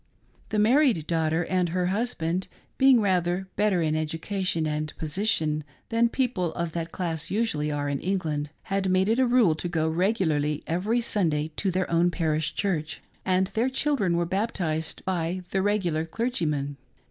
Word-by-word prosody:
The 215 - -1
married 225 - +4
daughter 160 0 0
and 180 -2 +1
her 180 +1 0
husband 185 -3 -1 0.3
being 265 -3 +6
rather 185 -1 +1
better 200 -5 +2
in 155 -1 +1
education 165 +2 -1
and 155 0 -2
position 155 -2 0 0.3
than 235 0 +3
people 230 -10 0
of 170 -1 -2
that 165 0 -4
class 165 -4 -3
usually 195 -9 0
are 145 -1 -2
in 140 -1 -1
England, 155 -6 -2
had 195 -2 -1
made 185 +1 +3
it 230 +3 +2
a 260 - +4
rule 240 -9 +4
to 160 +3 -4
go 160 -2 0
regularly 160 -4 +1
every 205 +8 0
Sunday 160 -9 0
to 195 - 0
their 185 0 0
own 170 +1 +4
parish 160 -3 -1
church, 160 -6 -1 0.3
and 185 0 +3
their 235 +3 0
children 260 - +1
were 170 - +1
baptized 175 -5 -2
by 180 0 -1
the 195 - +1
regular 190 -6 +1
clergyman. 160 - -2
180 Hz, 160 wpm, -26 LUFS, 160-205 Hz, 0.3 s, being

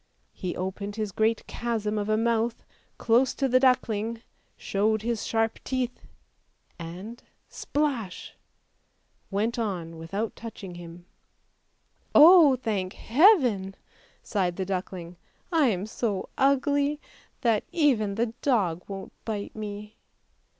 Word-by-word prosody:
He 180 -2 -4
opened 200 +2 -4
his 215 -2 -3
great 220 +3 +1
chasm 215 -3 -2
of 205 +1 -3
a 215 - +3
mouth 230 0 0 0.3
close 240 +3 +3
to 270 - +1
the 255 0 +4
duckling, 230 -3 +1 0.3
showed 215 +2 0
his 235 -2 -2
sharp 225 0 0
teeth 255 -2 -3 0.4
— - - -41
and 185 +8 -8 0.2
— - - -45
splash 270 -10 -3 0.5
— - - -45
went 220 +4 -1
on 175 -7 -3
without 195 +7 -4
touching 205 -5 -8
him. 175 0 -11 0.6
" - - -42
Oh, 315 -3 +9
thank 205 -6 -2
Heaven! 245 - +4 0.2
" - - -32
sighed 185 -4 -1
the 190 - -3
duckling, 180 -2 -5 0.2
" - - -39
I 280 - +5
am 195 -4 0
so 215 -3 -3
ugly 285 +2 +2 0.4
that 230 -4 +2
even 235 -11 +2
the 225 +1 -1
dog 195 - +1
won't 195 -1 -7
bite 210 -3 -4
me! 210 0 -7
220 Hz, 135 wpm, -27 LUFS, 195-240 Hz, 0.6 s, Oh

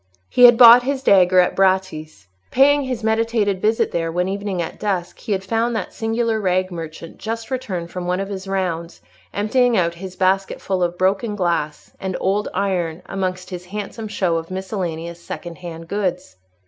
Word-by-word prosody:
He 250 - +6
had 240 -1 +8
bought 240 0 +10
his 265 +1 -2
dagger 185 -3 +5
at 180 - +3
Bratti's. 185 - 0 0.2
Paying 285 +2 +4
his 250 -4 -4
meditated 220 -3 +1
visit 220 +1 +1
there 165 -1 -1
one 180 +2 0
evening 200 -1 -3
at 170 - -4
dusk, 190 -4 -2
he - - -6
had 190 -1 0
found 225 +4 0
that - - -4
singular 225 0 -1
rag 185 -1 0
merchant 165 -1 -8
just 225 +2 -5
returned 185 -10 -4
from 180 -1 -5
one 180 +1 0
of 195 - -3
his 195 -1 -6
rounds, 175 -3 -3 0.3
emptying 240 +4 +2
out 170 -2 +1
his 185 +2 -9
basketful 190 0 0
of 175 0 0
broken 195 +4 0
glass 170 -6 -2
and 190 -1 -3
old 200 +2 0
iron 180 -3 -2
amongst 185 -1 -4
his 180 -1 -6
handsome 210 +3 -6
show 185 -5 0
of 165 0 -6
miscellaneous 175 -3 -4
second 170 0 -8
hand 165 -2 -8
goods. 185 - -3
190 Hz, 175 wpm, -20 LUFS, 175-215 Hz, 0.3 s, bought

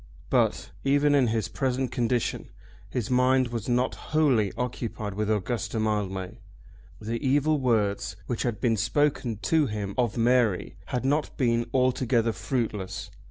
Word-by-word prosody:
But, - - +1
even 145 +1 +3
in 135 -4 +4
his 110 -4 0
present 125 +8 -1
condition, 120 -1 -1 0.4
his 125 0 -3
mind 130 0 +3
was 115 -1 -4
not 125 +1 +1
wholly 135 -11 +1
occupied 115 -4 -3
with 105 +1 -2
Augusta 110 +2 -1
Mildmay. 100 -4 -2 0.6
The 115 +2 -4
evil 145 +3 +2
words 110 -6 0
which 120 - -3
had 120 -4 -1
been 115 -3 +1
spoken 125 0 +1
to 160 -3 +3
him 105 -3 -4
of 120 -2 +1
Mary 115 -5 +2
had 125 +1 -2
not 145 +2 0
been 120 -2 +1
altogether 125 -3 +2
fruitless. 110 -6 -3
120 Hz, 140 wpm, -27 LUFS, 110-130 Hz, 0.6 s, in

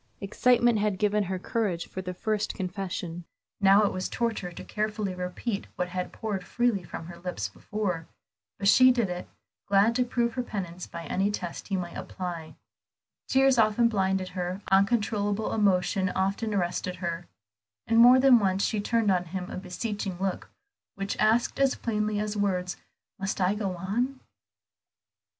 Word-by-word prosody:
Excitement 240 +3 +3
had 205 -2 0
given 210 0 +1
her 190 +1 -2
courage 185 -3 -2
for 190 - -6
the 180 -1 -5
first 215 +2 -1
confession, 180 -2 -4 0.4
now 200 +1 +6
it - - 0
was 185 0 -3
torture 225 -6 -2
to 170 - -9
carefully 210 -2 -2
repeat 180 +4 -4
what 180 0 -2
had 180 0 -3
poured 205 -4 -4
freely 235 -1 0
from 165 - -7
her 170 0 -9
lips 170 - -4
before. 180 - -3 0.5
But 200 - -1
she 255 +5 +8
did 235 -7 +2
it, 180 0 -5 0.4
glad 200 +3 +4
to 250 +1 +2
prove 235 -1 0
her 250 - -1
penitence 185 -6 -5
by 170 -1 -7
any 195 +6 0
test 180 -4 -5
he 195 - -1
might 175 -2 -5
apply. 170 -4 -6 0.7
Tears 270 -1 +4
often 225 +2 +4
blinded 190 -3 0
her, 180 +1 -4
uncontrollable 205 +1 +2
emotion 190 -2 +2
often 195 +4 -1
arrested 180 -1 -1
her; 170 -1 -4 0.6
and 230 0 +3
more 245 +2 +8
than 260 -2 +7
once 195 -1 +1
she 215 -2 0
turned 225 -1 +2
on 180 -1 +1
him 180 +1 -5
a - - -5
beseeching 195 +1 -4
look, 190 -1 -2 0.5
which 195 0 -3
asked 220 +5 +2
as 275 -1 +3
plainly 210 -2 -1
as 210 0 -2
words, 185 -4 0 0.4
"Must 195 0 -2
I 185 +1 +3
go 200 -3 -2
on?" 240 +9 -2
195 Hz, 165 wpm, -28 LUFS, 180-220 Hz, 0.7 s, she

